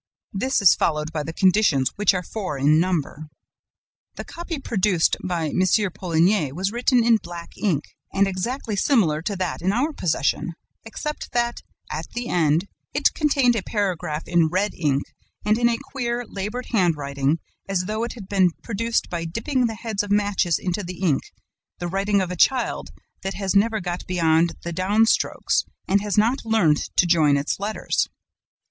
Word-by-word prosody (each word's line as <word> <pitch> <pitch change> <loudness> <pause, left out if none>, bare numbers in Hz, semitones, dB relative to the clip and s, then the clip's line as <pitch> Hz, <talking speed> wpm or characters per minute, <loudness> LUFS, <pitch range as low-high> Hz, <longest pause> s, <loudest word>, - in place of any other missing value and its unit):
This 255 +3 0
is 190 - +8
followed 150 0 -1
by 155 - -1
the 160 - -5
conditions, 180 -7 +3
which 205 -1 +3
are 180 - -2
four 185 -6 -4
in 150 +3 +4
number. 160 -3 -1 0.9
"The - - -6
copy 340 -1 -6
produced 200 - +1
by 170 -4 -1
M. 185 - 0 0.3
Poligny 175 -3 +1
was 190 +7 -2
written 240 +1 +2
in 230 -1 +5
black 175 -4 -9
ink 165 -9 0 0.3
and 200 0 +2
exactly 215 +4 -3
similar 190 - +2
to 200 +4 -3
that 185 -3 -3
in 185 +3 +1
our 275 +9 0
possession, 170 - 0 0.3
except 300 +7 -5
that, 240 0 0 0.3
at - - -4
the 240 0 -3
end, 165 +2 +2 0.3
it - - +3
contained 275 -5 +2
a 220 - 0
paragraph 180 -7 -2
in 170 -2 +3
red 185 +5 0
ink 145 -4 0 0.4
and 215 +2 +3
in 235 0 +4
a 230 - 0
queer, 245 -3 -3
labored 210 +6 -5
handwriting, 150 - +1 0.3
as 190 -2 0
though 215 +4 -2
it 235 - -3
had 215 -6 -10
been 190 -2 +3
produced 230 +1 -1
by 170 -2 -4
dipping 235 - 0
the 225 - -4
heads 220 -2 -2
of 205 - -6
matches 205 -4 +2
into 185 +2 -2
the 180 0 -7
ink, 155 -7 +2 0.6
the 175 - -5
writing 195 +2 +1
of 180 -1 -2
a - - -3
child 250 +8 +1 0.3
that 195 0 -4
has 195 -1 -2
never 220 +2 +3
got 175 0 -5
beyond 165 -1 +2
the 170 - -4
down 200 +6 +3
strokes - - +1 0.2
and 200 +1 +3
has 205 0 -2
not 235 +6 +2
learned 220 -10 +3 0.2
to - - +5
join 155 -4 +4
its 140 +6 -2
letters. 210 +2 -1
195 Hz, 175 wpm, -23 LUFS, 170-225 Hz, 0.9 s, is